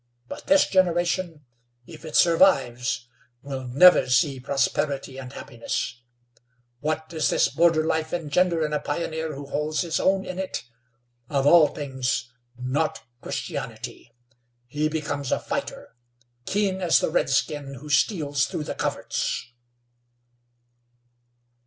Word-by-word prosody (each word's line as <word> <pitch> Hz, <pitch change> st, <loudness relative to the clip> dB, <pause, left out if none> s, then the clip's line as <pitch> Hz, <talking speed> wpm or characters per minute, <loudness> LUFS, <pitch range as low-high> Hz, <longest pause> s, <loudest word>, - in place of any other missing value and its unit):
But -, -, -9 dB
this 290 Hz, 0 st, +5 dB
generation, 175 Hz, -3 st, +1 dB, 0.4 s
if 160 Hz, +2 st, -12 dB
it 155 Hz, -, -6 dB
survives, 135 Hz, -9 st, +3 dB, 0.4 s
will 135 Hz, -2 st, -5 dB
never 160 Hz, +3 st, +6 dB
see 135 Hz, +1 st, +2 dB
prosperity 135 Hz, 0 st, -1 dB
and 125 Hz, -1 st, -8 dB
happiness. 120 Hz, -1 st, -5 dB, 0.8 s
What 155 Hz, +2 st, -2 dB
does 160 Hz, -2 st, 0 dB
this -, -, +3 dB
border 165 Hz, -1 st, +3 dB
life 160 Hz, 0 st, -1 dB
engender 170 Hz, 0 st, +1 dB
in 150 Hz, -, -3 dB
a 150 Hz, -, +1 dB
pioneer 160 Hz, +1 st, -3 dB
who 140 Hz, +1 st, -7 dB
holds 150 Hz, +2 st, -1 dB
his 170 Hz, -3 st, -1 dB
own 190 Hz, 0 st, +2 dB
in 185 Hz, -, -6 dB
it? 190 Hz, -8 st, -4 dB, 0.7 s
Of 140 Hz, -2 st, 0 dB
all 155 Hz, +1 st, +7 dB
things, 130 Hz, -4 st, -3 dB, 0.3 s
not 130 Hz, +5 st, -2 dB, 0.2 s
Christianity. 120 Hz, -, -6 dB, 0.5 s
He 150 Hz, +5 st, -1 dB
becomes 145 Hz, -3 st, -3 dB
a -, -, +2 dB
fighter, -, -, -5 dB, 0.5 s
keen 195 Hz, -2 st, 0 dB
as 175 Hz, -3 st, +4 dB
the -, -, -1 dB
redskin 140 Hz, +1 st, 0 dB
who 145 Hz, +4 st, -11 dB
steals 145 Hz, -2 st, +2 dB
through 155 Hz, -, -4 dB
the -, -, -4 dB
coverts." -, -, -2 dB
150 Hz, 125 wpm, -25 LUFS, 135-170 Hz, 0.8 s, all